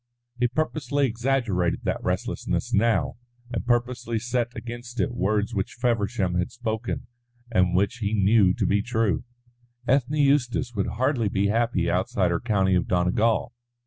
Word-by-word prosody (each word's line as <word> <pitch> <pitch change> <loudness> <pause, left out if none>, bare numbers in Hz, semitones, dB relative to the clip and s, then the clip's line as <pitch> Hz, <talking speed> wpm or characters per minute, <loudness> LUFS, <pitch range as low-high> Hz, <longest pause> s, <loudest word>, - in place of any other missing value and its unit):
He 125 - +3
purposely 145 0 0
exaggerated 115 -7 0
that - - -2
restlessness - - -2
now, 110 0 +2 0.3
and 120 - -3
purposely 120 -1 0
set 120 +1 -1
against 120 +1 -7
it - - +1
words 105 0 0
which 100 -2 -2
Feversham 105 -6 0
had 90 - -1
spoken 115 -1 -3 0.5
and 90 -4 +2
which 100 +6 +1
he 105 -1 -1
knew 100 -1 +4
to - - 0
be 100 0 +2
true. 110 -5 0 0.6
Ethne 135 +2 +2
Eustace 135 -3 +2
would 100 -3 -1
hardly 120 -1 0
be 100 +1 +1
happy 115 -5 +1
outside 90 +1 +1
her 85 - 0
county 95 -5 +1
of 90 -2 +1
Donegal. 105 +6 +1
115 Hz, 145 wpm, -25 LUFS, 100-125 Hz, 0.6 s, knew